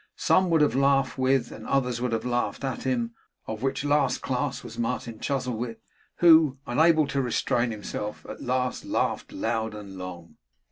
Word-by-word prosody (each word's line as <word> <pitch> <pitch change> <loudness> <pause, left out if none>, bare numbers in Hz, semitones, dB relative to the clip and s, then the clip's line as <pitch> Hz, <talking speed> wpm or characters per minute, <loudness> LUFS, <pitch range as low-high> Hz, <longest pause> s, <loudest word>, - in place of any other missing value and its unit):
Some 185 -1 +3
would 165 -2 +4
have 150 - +3
laughed 135 0 +2
with, 130 -2 +2
and - - -9
others 125 -3 0
would 125 -1 -1
have 115 0 -1
laughed 120 +2 -1
at 135 -1 -3
him; 120 -3 0 0.3
of 110 0 -5
which 135 +1 -1
last 145 +1 +2
class - - -2
was - - -9
Martin 115 -1 -3
Chuzzlewit, 125 -4 -2 0.4
who, 160 -5 +6
unable 155 +5 +4
to 140 0 -1
restrain 120 -1 0
himself, 105 -1 -5
at - - -8
last 125 0 -1
laughed - - -1
loud 110 -1 -2
and 100 -3 -9
long. 85 -3 -8
125 Hz, 170 wpm, -26 LUFS, 115-135 Hz, 0.4 s, who